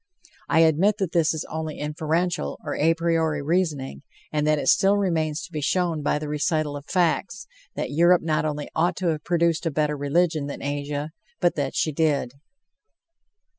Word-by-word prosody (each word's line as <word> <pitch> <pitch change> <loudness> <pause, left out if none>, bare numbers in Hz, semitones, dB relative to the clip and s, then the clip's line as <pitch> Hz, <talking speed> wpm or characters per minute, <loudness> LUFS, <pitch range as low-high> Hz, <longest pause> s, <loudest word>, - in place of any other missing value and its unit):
I 165 - +4
admit 165 +6 +3
that 190 -5 -2
this 165 -3 +3
is 160 - -4
only 160 -1 -5
inferential, 155 - -2
or - - -3
a 165 +2 +3
priori 165 -3 0
reasoning, 150 - -1 0.3
and 150 0 +1
that 155 0 +3
it - - -3
still 195 +1 +4
remains 165 -4 0
to 180 - -10
be 155 -2 -4
shown 170 +1 0
by 150 - +1
the 150 0 -5
recital 150 0 -1
of 145 0 -8
facts, 190 +4 0 0.3
that - - -3
Europe 170 +4 +4
not 155 -2 0
only 150 -1 -3
ought 175 +2 +1
to 180 0 -1
have 155 -2 -2
produced 170 -1 +1
a - - +2
better 150 0 0
religion 155 +1 0
than 140 - -7
Asia, 145 +1 -3 0.3
but 175 - +2
that 140 -3 -3
she 155 - +1
did. 145 -5 0
155 Hz, 180 wpm, -24 LUFS, 150-170 Hz, 0.3 s, I